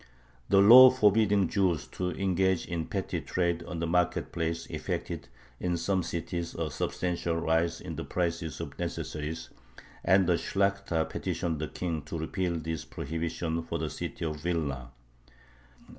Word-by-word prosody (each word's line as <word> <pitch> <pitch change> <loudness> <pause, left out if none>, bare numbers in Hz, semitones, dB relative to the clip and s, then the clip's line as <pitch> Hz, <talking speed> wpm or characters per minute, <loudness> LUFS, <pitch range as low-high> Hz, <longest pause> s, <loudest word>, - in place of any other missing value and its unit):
The 100 0 +6
law 125 +5 +11
forbidding 105 -5 +3
Jews 90 -7 +1
to 90 -1 -2
engage 95 -1 +1
in 85 -2 -3
petty - - -2
trade 85 -2 0
on 90 - -5
the 85 - -1
market 90 +1 +1
place 85 0 -2
effected - - -4 0.3
in 90 -1 0
some 95 +3 +1
cities 85 0 -4
a 80 -2 -2
substantial 85 -2 -1
rise 85 0 +1
in - - -7
the - - -3
prices 85 -4 -2
of - - -7
necessaries, 75 +2 -4 0.5
and 95 +1 +5
the 85 -1 +2
Shlakhta 100 -4 0
petitioned 80 -3 -2
the 80 - -2
King 85 -2 -3
to 85 - -5
repeal 85 +2 -2
this 80 -1 -4
prohibition 80 +1 -3
for - - -4
the - - -3
city 85 - -5
of 75 -1 -2
Vilna. 75 -6 -2
85 Hz, 150 wpm, -29 LUFS, 80-95 Hz, 0.5 s, law